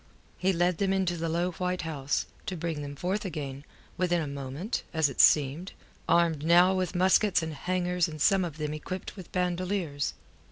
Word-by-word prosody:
He 190 +1 +2
led 175 -1 +1
them 195 -1 +1
into 190 -2 +1
the 165 0 -2
low 175 +2 0
white 180 -1 -2
house, 145 -3 -1 0.2
to 185 - -3
bring 160 -2 -3
them 145 0 -6
forth 185 +7 -2
again, 145 -7 -5 0.3
within 175 -1 +1
a 160 - -2
moment, 140 - -4
as 160 -3 +3
it 135 - +3
seemed, 150 +5 +3 0.4
armed 165 -4 +3
now 175 +3 +6
with 185 -2 -1
muskets 185 0 +3
and 160 -1 -4
hangers 180 +3 0
and 155 -1 -8
some 190 +5 +4
of 165 -4 -5
them 150 -1 -3
equipped 180 +5 -6
with 185 -4 -11
bandoleers. 180 -4 -1
170 Hz, 185 wpm, -28 LUFS, 150-185 Hz, 0.4 s, now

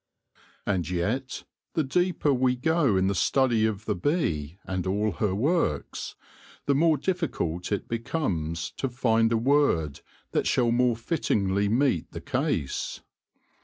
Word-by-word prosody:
And 90 -4 -1
yet, 110 +10 -2 0.3
the 160 - +2
deeper 175 0 +1
we 125 0 +2
go 140 - +2
in 95 - +2
the 100 - +1
study 115 +3 +2
of 105 0 -4
the 105 - 0
bee 85 - -1
and 95 -1 -3
all 105 +3 +1
her 95 +1 -1
works, 130 - -1 0.5
the 140 - +3
more 155 +2 +3
difficult 140 - -2
it 100 - -1
becomes 100 - -2
to 135 - -1
find 115 -2 +2
a 115 - +3
word 115 - +2 0.3
that - - 0
shall 120 -2 +2
more 120 0 +3
fittingly 100 - 0
meet 120 - +1
the - - -5
case. 65 - -2
115 Hz, 140 wpm, -27 LUFS, 95-140 Hz, 0.5 s, the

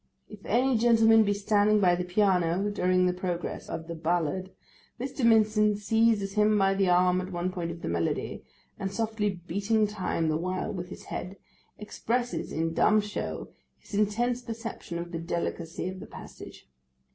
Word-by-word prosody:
If 210 -2 -13
any 250 +1 +2
gentleman 225 -1 +5
be 205 -1 +1
standing 210 +1 +3
by 180 -3 +4
the 180 +1 -1
piano 185 0 +1
during 185 -2 +2
the 180 - +2
progress 180 -2 -4
of 165 0 -5
the 170 - -5
ballad, 170 +2 -1 0.5
Mr. 265 +1 -4
Mincin 215 -2 +4
seizes 215 -1 +2
him 210 0 +3
by 195 -1 +3
the 195 -1 +1
arm 180 +1 +3
at 185 +1 -7
one 175 +1 -2
point 175 -2 -4
of 170 0 -8
the - - -3
melody, 85 -1 -2 0.4
and 195 0 -3
softly 220 0 -1 0.2
beating 205 +5 +1
time 190 -5 -2
the 155 0 +1
while 185 +4 -3
with 180 -2 -6
his - - -10
head, 185 +3 -6 0.4
expresses 240 +3 -3
in 165 +1 -1
dumb 215 +6 +4
show 210 0 -4 0.3
his - - -18
intense 230 +4 +1
perception 230 -7 -6
of 170 0 -6
the 165 - -4
delicacy 170 0 -3
of 185 0 -7
the - - -9
passage. - - -11
195 Hz, 170 wpm, -28 LUFS, 175-215 Hz, 0.5 s, gentleman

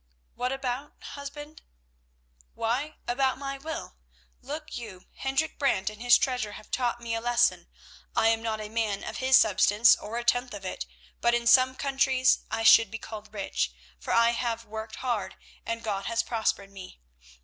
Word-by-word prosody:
"What 250 +1 -2
about, 270 +1 -3
husband?" 295 +2 -9 0.9
"Why, 270 +7 -1
about 260 +2 +1
my 275 0 -5
will. 315 - -6 0.4
Look 305 +2 -7
you, 210 -6 -8
Hendrik 270 +4 -1
Brant 210 -8 +1
and 215 +1 -13
his 245 0 +7
treasure 245 -6 -1
have 215 - -12
taught 240 -2 0
me 235 -1 -4
a 225 - -1
lesson. 240 0 +2 0.5
I 225 - +4
am 225 0 +1
not 220 -1 -2
a 215 - -5
man 215 -2 -2
of - - -5
his 260 0 +5
substance, 210 +2 +5
or 220 +3 -6
a 240 - -2
tenth 245 0 +1
of 195 -1 -9
it, 65 - -5 0.3
but 235 0 +3
in 240 0 -1
some 255 +2 +5
countries 265 -2 +2
I 225 - -2
should 225 -1 +7
be 225 - -5
called 215 -1 -9
rich, 195 - -2 0.3
for - - -5
I 230 0 +5
have 230 -1 -2
worked 220 0 -7
hard 230 -7 -3 0.3
and 230 0 -3
God 200 -3 -2
has 230 0 0
prospered 220 -4 -1
me. 190 - -11
235 Hz, 175 wpm, -27 LUFS, 215-260 Hz, 0.9 s, his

